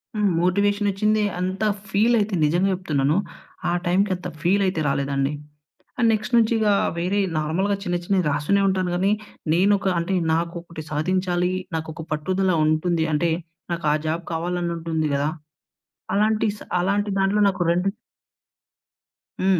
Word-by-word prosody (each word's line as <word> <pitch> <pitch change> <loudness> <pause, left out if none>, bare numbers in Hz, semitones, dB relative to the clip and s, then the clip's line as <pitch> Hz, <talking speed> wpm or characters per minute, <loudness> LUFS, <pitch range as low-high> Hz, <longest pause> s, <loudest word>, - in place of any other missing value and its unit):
హ్మ్. 210 -1 +2
మోటివేషనొచ్చింది. 205 +3 +2 0.2
అంత 185 +3 -2 0.3
ఫీల్ 225 +4 +3
అయితే 205 -2 0
నిజంగా 175 +6 +2
చెప్తున్నాను, 155 -4 0 0.5
ఆ - - +1
టైమ్‌కి 190 +3 +2
అంత 180 0 -7
ఫీల్ 195 +3 +2
అయితే 185 -3 -1
రాలేదండి. 140 0 0 0.7
అండ్ 230 -2 +4
నెక్స్ట్ 220 +3 -3
నుంచి 230 -1 +4
ఇక 215 -1 +2 0.3
వేరే 180 +4 0 0.2
నార్మల్‌గా 180 +7 0
చిన్న, 175 -3 0
చిన్నవి 185 0 +1
రాస్తూనే 150 +8 +1
ఉంటాను 185 -1 0
కానీ, 195 +3 +2 0.4
నేను 190 +4 +4
ఒక 195 - -1
అంటే 170 +3 -1 0.2
నాకు 170 +1 -1
ఒకటి 170 -2 -9
సాధించాలి 180 +3 0 0.2
నాకు 160 0 -4
ఒక 160 - -7
పట్టుదల 185 +5 0
ఉంటుంది 160 +1 +1
అంటే, 165 +3 +1 0.4
నాకు 170 -1 -4
ఆ - - +3
జాబ్ 165 +2 -1
కావాలని 175 +1 -2
ఉంటుంది 160 -2 -1
కదా, 140 +1 +1 0.9
అలాంటి 215 +2 +2
స - - -16 0.2
అలాంటి 200 +3 0
దాంట్లో 195 +2 +2
నాకు 185 -2 -1
రెండు 180 +3 +1 1.5
హ్మ్. 190 -1 +3
180 Hz, 145 wpm, -23 LUFS, 165-200 Hz, 1.5 s, అండ్